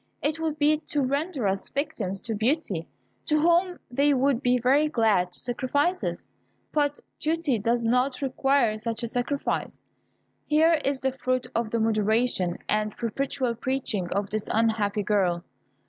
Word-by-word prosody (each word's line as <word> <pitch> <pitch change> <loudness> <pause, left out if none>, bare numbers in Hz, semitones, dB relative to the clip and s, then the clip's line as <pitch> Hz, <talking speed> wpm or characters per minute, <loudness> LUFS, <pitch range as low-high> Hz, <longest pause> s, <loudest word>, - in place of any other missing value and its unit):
It 300 +2 -1
would 315 -2 -2
be 305 0 +3
to 295 -4 0
render 280 - -1
us 195 0 -1
victims 205 -9 -3
to 230 - -3
Beauty, 215 - -1 0.4
to 305 -1 +3
whom 345 +3 +3
they 280 +3 +3
would 265 -1 +2
be 250 -1 +3
very 270 +5 +3
glad 220 - +2
to - - -10
sacrifice 285 +8 0
us; - - -4 0.4
but 290 -1 +1 0.2
duty 315 -6 0
does 235 +3 0
not 250 +3 +2
require 270 -4 +1
such 230 +1 -3
a - - -1
sacrifice. 245 +4 -2 0.6
Here 315 +1 +4
is 275 -1 -1
the 265 - +1
fruit 255 -1 -1
of 230 -1 -1
the 230 - -1
moderation 220 -4 +1
and 215 0 0
perpetual 255 +2 -1
preaching 235 -6 -2
of 200 +2 -2
this 215 -1 -2
unhappy 215 -2 +1
girl! 185 -4 +1
250 Hz, 155 wpm, -26 LUFS, 215-285 Hz, 0.6 s, Here